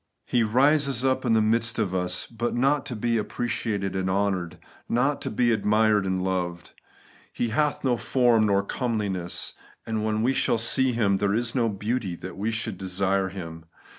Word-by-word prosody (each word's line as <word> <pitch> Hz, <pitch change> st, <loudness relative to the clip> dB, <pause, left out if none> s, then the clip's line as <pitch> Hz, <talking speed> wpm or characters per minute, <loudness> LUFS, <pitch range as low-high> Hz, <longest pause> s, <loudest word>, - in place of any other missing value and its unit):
He 120 Hz, -, +1 dB
rises 135 Hz, +3 st, +2 dB
up 130 Hz, 0 st, +1 dB
in 115 Hz, -, +3 dB
the 110 Hz, -1 st, +4 dB
midst 115 Hz, +1 st, +2 dB
of 105 Hz, -5 st, -1 dB
us> 90 Hz, 0 st, 0 dB
but 120 Hz, +1 st, -3 dB
not 135 Hz, +3 st, +1 dB
to 125 Hz, -, -4 dB
be 115 Hz, +1 st, 0 dB
appreciated 105 Hz, -3 st, -3 dB
and 95 Hz, 0 st, -1 dB
honoured; 95 Hz, -3 st, -1 dB, 0.3 s
not 135 Hz, +5 st, +1 dB
to -, -, -3 dB
be 120 Hz, +2 st, +1 dB
admired 105 Hz, -1 st, +2 dB
or -, -, -1 dB
loved. 90 Hz, -2 st, -2 dB, 0.3 s
* -, -, -27 dB, 0.2 s
He 120 Hz, -, -2 dB
hath 150 Hz, +6 st, 0 dB
no 125 Hz, -3 st, +2 dB
form 120 Hz, -3 st, +3 dB
nor 100 Hz, -1 st, +2 dB
comeliness; 100 Hz, -7 st, -2 dB, 0.3 s
and 110 Hz, -1 st, -2 dB
when 110 Hz, 0 st, 0 dB
we 130 Hz, +3 st, +2 dB
shall 120 Hz, -, +1 dB
see 130 Hz, +3 st, +2 dB
Him, 100 Hz, -4 st, +2 dB
there 100 Hz, +1 st, +1 dB
is 120 Hz, 0 st, 0 dB
no 120 Hz, -3 st, +1 dB
beauty 105 Hz, -1 st, -2 dB
that 90 Hz, +2 st, -8 dB
we 105 Hz, +3 st, -2 dB
should 115 Hz, 0 st, -3 dB
desire 95 Hz, 0 st, 0 dB
Him.' 80 Hz, -4 st, -8 dB
110 Hz, 185 wpm, -25 LUFS, 95-120 Hz, 0.3 s, the